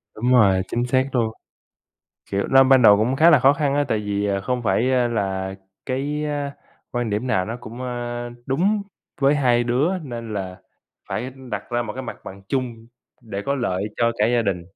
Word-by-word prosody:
Đúng 120 +3 0
rồi, 100 -7 +5
chính 120 +1 -1
xác 130 +2 +1
luôn. 115 -2 +1 1.0
Kiểu, 100 0 0
nó 135 0 +7
ban 130 -1 +5
đầu 105 -2 +8
cũng 120 +5 +1
khá 165 +4 +6
là 150 - +7
khó 135 +2 +5
khăn 145 -2 0
á, 145 0 +2
tại 110 - +1
vì, 105 -1 -2
ờ, 100 -1 0
không 125 +4 -2
phải, 115 +5 +1
ơ, 125 -2 +2
là 95 -4 -2 0.3
cái 145 +3 -2 0.7
quan 120 -3 -2
điểm 105 +5 -1
nào 95 -7 +1
nó 115 +2 -5
cũng, 120 +2 -9
ơ, 120 -1 -4 0.2
đúng 190 +10 +1 0.4
với 140 +2 +4
hai 125 -4 +2
đứa, 140 +10 +1
nên 115 -5 -6
là 95 -2 -5 0.5
phải 125 +4 -3 0.2
đặt - - -3
ra 120 0 0
một 110 -3 -5
cái 130 - -6
mặt 125 - -6
bằng 95 +1 -10
chung 120 -4 -3 0.3
để 100 -4 -6
có 140 - +1
lợi 100 -8 -1
cho 115 -1 +2
cả 105 - +4
gia 120 0 +2
đình. 95 -4 -1
120 Hz, 205 wpm, -22 LUFS, 105-130 Hz, 1.0 s, đầu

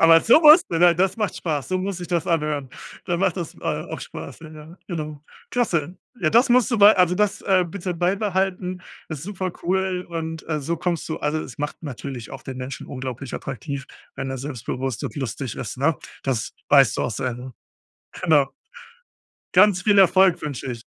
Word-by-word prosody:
Aber 165 0 +7
so 235 - +6
musst 310 +2 +8
du, 165 - 0
ne, 175 0 +6
das 185 +2 +1
macht 215 -3 -2
Spaß, 150 -5 -3
so 185 - 0
muss 190 +1 -3
sich 175 - -7
das 170 -3 0
anhören. 150 -4 0 0.4
Dann 175 -2 0
macht 195 -1 +1
das, 170 -4 -5
äh, - - -19
auch - - -3
Spaß, - - -9
ja, 160 - -10
ja, 155 +3 -12
genau. 155 -4 -5 0.3
Klasse. 180 -9 0 0.2
Ja, 165 - +2
das 235 +10 +4
musst 250 0 +4
du 235 - +2
bei 210 0 +7
also 180 -1 +4
das, 205 +1 +1
äh, 185 -2 +3
bitte 180 +1 -4
beibehalten. 185 0 -1 0.3
Ist 155 -4 -6
supercool 185 0 -2
und, 160 -1 -5
äh, 155 -1 -1
so 165 +5 -2
kommst 170 0 -2
du 155 - -3
also 150 +1 -1
es 130 -6 -9
macht 150 +3 -4
natürlich 130 -5 -7
auch 135 - -8
den 130 -1 -7
Menschen 130 +1 -6
unglaublich 130 -1 -6
attraktiv, 140 +1 -5 0.3
wenn 135 - -4
er 130 - -4
selbstbewusst 130 -2 -4
und - - -5
lustig 130 -2 -4
ist, 125 - -6
ne? 150 +3 +2 0.3
Das 130 -4 -2 0.2
weißt 135 -5 +5
du - - +1
auch - - -1
sehr, 125 +3 -2
ne? 125 +2 -9 0.7
Genau. 150 -6 +3 1.0
Ganz 185 -1 +5
viel 205 0 +4
Erfolg 190 -1 +5
wünsche 140 -3 -4
ich. 115 -2 -6
165 Hz, 195 wpm, -23 LUFS, 140-185 Hz, 1.0 s, musst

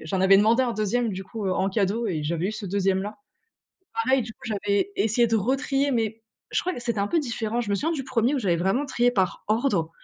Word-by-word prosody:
j'en 185 +4 -2
avais 190 +1 +6
demandé 225 +5 +4
un 245 - 0
2e, 220 +2 0
du 190 0 -5
coup, 205 +1 -5
heu, 185 - +1
en 190 - +1
cadeau 210 +3 0
et 160 -6 -2
j'avais 165 +4 -1
eu 215 - -2
ce 215 -2 -6
2e 190 0 +1
là. 210 +1 -6 0.9
Pareil, 265 -1 +3
du 225 0 -8
coup, - - -40
j'avais 200 -2 0
essayé 220 +4 +3
de 225 - +1
retrier, 270 +5 0
mais 225 -1 -1 0.3
je - - +1
crois 365 - -2
que - - -6
c'était 235 -3 -1
un 200 - +1
peu 335 - +2
différent. 235 -3 -2
Je 210 -4 -4
me - - +2
souviens 320 - 0
du 270 -5 -3
1er 255 +2 +1
où - - 0
j'avais 180 -7 +1
vraiment 195 - 0
trié 245 -2 +2
par 190 -6 -1
ordre, 215 -8 +1
215 Hz, 250 wpm, -25 LUFS, 195-240 Hz, 0.9 s, avais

